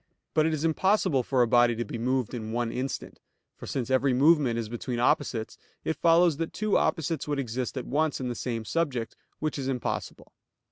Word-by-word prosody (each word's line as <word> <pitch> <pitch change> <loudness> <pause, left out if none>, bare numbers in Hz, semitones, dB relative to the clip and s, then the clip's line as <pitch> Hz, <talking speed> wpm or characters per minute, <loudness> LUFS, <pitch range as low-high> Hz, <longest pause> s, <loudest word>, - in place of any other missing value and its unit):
But 155 0 +3
it 160 - 0
is 155 +1 -2
impossible 185 -3 +2
for 125 0 +2
a - - +1
body 120 0 +4
to 120 +1 -3
be 115 - -6
moved 125 0 0
in 110 -2 -5
one 120 0 -1
instant; 130 +2 -4 0.4
for - - -10
since 130 -1 -3
every 130 0 +3
movement 140 -3 +4
is 115 -2 -2
between 120 +2 -4
opposites, 115 -1 0 0.2
it 160 - -1
follows 165 0 +4
that 165 0 -3
two 215 -1 0
opposites 165 -3 0
would 145 -1 -1
exist 125 0 -3
at 130 - -3
once 150 +2 0
in 130 - -3
the 120 - -2
same 115 -2 -4
subject, 135 -8 -1 0.2
which 155 -1 -2
is 135 - -3
impossible. 130 -2 -4
130 Hz, 200 wpm, -27 LUFS, 120-155 Hz, 0.4 s, body